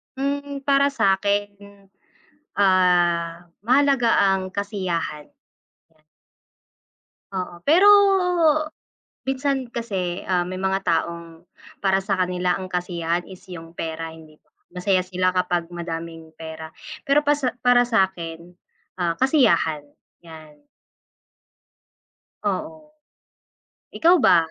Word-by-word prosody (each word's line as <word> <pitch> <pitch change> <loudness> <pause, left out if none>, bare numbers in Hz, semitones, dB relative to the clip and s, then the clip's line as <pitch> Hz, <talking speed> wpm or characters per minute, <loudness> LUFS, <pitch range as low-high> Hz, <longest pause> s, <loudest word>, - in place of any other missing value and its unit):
Hmm, 280 +1 -3
para 280 0 +3
sa'kin, 200 -1 +1 1.0
ah, 175 -3 +2
mahalaga 260 0 +3 0.2
ang 190 -1 -4
kasiyahan. 185 -7 -3 2.1
Oo, 180 -2 -4
pero 360 +7 +6 1.4
minsan 270 -1 -1
kasi, 195 -7 -4
ah, 180 -2 0
may 185 - -5
mga 190 0 0
taong 165 0 -2 0.4
para 190 0 +3
sa 195 0 -1
kanila 180 -1 0
ang 185 -1 -7
kasiyahan 175 -1 -2
is 190 0 -12
yung 165 -1 -10
pera 165 0 -5
hindi 155 -1 -16 0.3
masaya 185 0 +1
sila 185 0 0
kapag 175 -2 0
madaming 165 -1 -7
pera. 160 -1 -9 0.3
Pero 280 +1 +4
pasa 290 -3 +1
para 245 -1 +5
sa'kin, 180 -6 -2 0.4
ah, 175 -2 0
kasiyahan, 175 - +2 0.4
yan. 155 -3 -14 1.9
Oo. 315 -1 -6 1.0
Ikaw 345 +2 +5
ba? - - +6
185 Hz, 95 wpm, -23 LUFS, 170-240 Hz, 2.1 s, pero